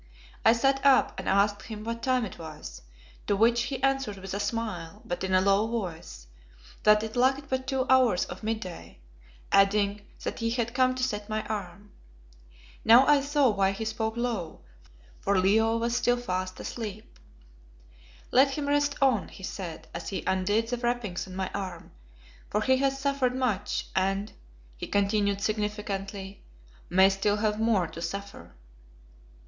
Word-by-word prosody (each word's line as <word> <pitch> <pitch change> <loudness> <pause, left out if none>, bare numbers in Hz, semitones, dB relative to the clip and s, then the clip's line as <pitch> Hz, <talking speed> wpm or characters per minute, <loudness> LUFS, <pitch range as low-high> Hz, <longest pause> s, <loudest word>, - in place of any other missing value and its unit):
I 225 - +7
sat 270 +3 +1
up 275 -2 +4
and - - -3
asked 205 +1 +2
him 215 -2 -8
what 230 +1 -4
time 255 -2 +1
it 190 - -9
was, 155 - -9 0.5
to 205 - +2
which 235 +3 +3
he 265 -2 -5
answered 270 -6 +1
with 190 0 -7
a 200 - -2
smile, 205 -6 -4
but 175 +1 -4
in 190 - -2
a 185 0 +4
low 200 +3 +3
voice, 170 - -5 0.6
that 210 0 +5
it 220 +1 -5
lacked 265 +3 +2
but 260 0 -2
two 265 -2 0
hours 255 -8 +4
of 180 - -9
mid 220 0 -2
day, 180 -2 -9 0.5
adding 200 +1 +3 0.2
that - - -4
he 230 -1 0
had 235 0 -1
come 255 0 +3
to 255 - -3
set 210 -4 -2
my 215 0 -2
arm. 205 -1 -6 0.9
Now 240 +4 +7
I 290 -1 +5
saw 285 -1 +2
why 195 -2 +1
he 220 +3 -5
spoke 220 +1 -2
low, 235 -8 -3 0.6
for 200 0 +1
Leo 220 +4 +3
was 235 +1 -1
still 245 0 +2
fast 185 -5 -3
asleep. 215 - -7 1.1
"Let 270 +2 +4
him 290 -1 -2
rest 290 0 +2
on," 255 -7 +3
he 190 - -13
said, 185 -4 -6
as 170 - -5
he 195 - -4
undid 205 +5 +1
the 245 - -1
wrappings 240 -7 -2
on 185 - -9
my 190 0 -3
arm, 195 -2 -6 0.6
"for 210 - 0
he 260 +3 +3
has 270 0 +1
suffered 275 -2 0
much, 215 -6 -1
and," 195 +2 0 0.4
he - - -6
continued 200 0 +1
significantly, 205 -2 -3 0.5
"may 190 +1 +6
still 195 +2 +1
have 210 0 0
more 220 -5 +2
to 165 0 -9
suffer." 195 - -6
215 Hz, 165 wpm, -28 LUFS, 195-245 Hz, 1.1 s, I